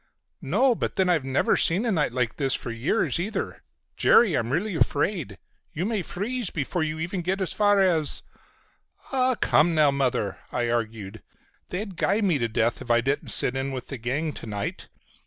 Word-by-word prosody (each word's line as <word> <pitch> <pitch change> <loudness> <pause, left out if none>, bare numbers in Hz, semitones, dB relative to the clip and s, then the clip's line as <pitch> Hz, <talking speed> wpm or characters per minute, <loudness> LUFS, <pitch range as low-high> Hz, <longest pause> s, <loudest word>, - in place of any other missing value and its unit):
"No. 235 - +3
But - - -3
then 190 -2 +2
I've 165 -6 +2
never 135 +1 +1
seen 185 +8 +2
a 230 - +1
night 155 - +1
like 125 -2 -1
this 135 -3 +2
for 120 - -4
years 135 - 0
either. 200 +6 -3 0.4
Jerry, 215 -8 +5
I'm 120 -3 -1
really 190 +8 -1
afraid. 160 - 0 0.4
You 170 - -2
may 215 -2 -1
freeze 215 +5 -3
before 160 +4 -2
you 155 0 -2
even 175 +3 -3
get 185 +3 -1
as 190 - -1
far 205 -1 +3
as—" 170 -6 +2 0.9
"Ah, 255 -2 +2
come 165 +2 +3
now, 150 -2 +5
Mother," 130 -8 -1
I 120 -1 -1
argued. 110 -3 -3 0.5
"They'd 190 0 -5
guy 205 - +1
me 180 -8 +2
to 115 - 0
death 115 +1 0
if - - -9
I 120 0 +4
didn't 135 +4 -1
sit 125 - +1
in 135 +1 -2
with 130 -2 -6
the 135 - -5
gang 145 +7 -2
to - - -8
night. 105 -1 -4
155 Hz, 190 wpm, -25 LUFS, 125-190 Hz, 0.9 s, Jerry